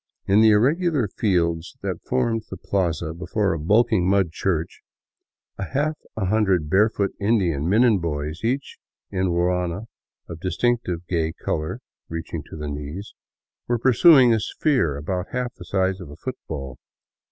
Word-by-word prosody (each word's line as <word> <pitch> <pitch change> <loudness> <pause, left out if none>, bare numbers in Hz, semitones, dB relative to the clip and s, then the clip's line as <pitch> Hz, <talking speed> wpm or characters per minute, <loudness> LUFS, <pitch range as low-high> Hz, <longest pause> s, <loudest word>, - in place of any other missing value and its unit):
In 100 +3 +4
the 110 - +7
irregular 140 - +3
field 85 -5 0 0.2
that 95 -4 -3
formed 120 -3 -1
the 95 - -6
plaza 85 -4 -1
before 95 +3 -1
a 80 - -3
bulking 100 +2 +3
mud 95 -4 +2
church, 85 -2 -2 0.8
a - - -2
half 150 +3 +1 0.2
hundred 95 -6 +1
barefoot 100 0 +3
Indian 90 -8 +1
men 110 +5 +4
and 110 -7 +4
boys, 75 +1 -3
each 130 +4 -2 0.3
in 95 -1 0
a - - 0
ruana 90 +2 0 0.4
of 85 - -8
dis 90 -1 -3
tinctive 115 -8 0
gay 80 -2 0
color 75 -1 -3 0.3
reaching 80 -1 -5
to - - -8
the 75 -1 -5
knees, 75 +7 -6 0.5
were 120 - +1
pursuing 130 +1 +6
a 110 - +2
sphere 110 - 0
about 90 +5 -3
half 125 -1 -2
the - - -12
size 95 -1 0
of 85 - -9
a 75 - -10
football. 75 - -6
95 Hz, 155 wpm, -23 LUFS, 85-115 Hz, 0.8 s, the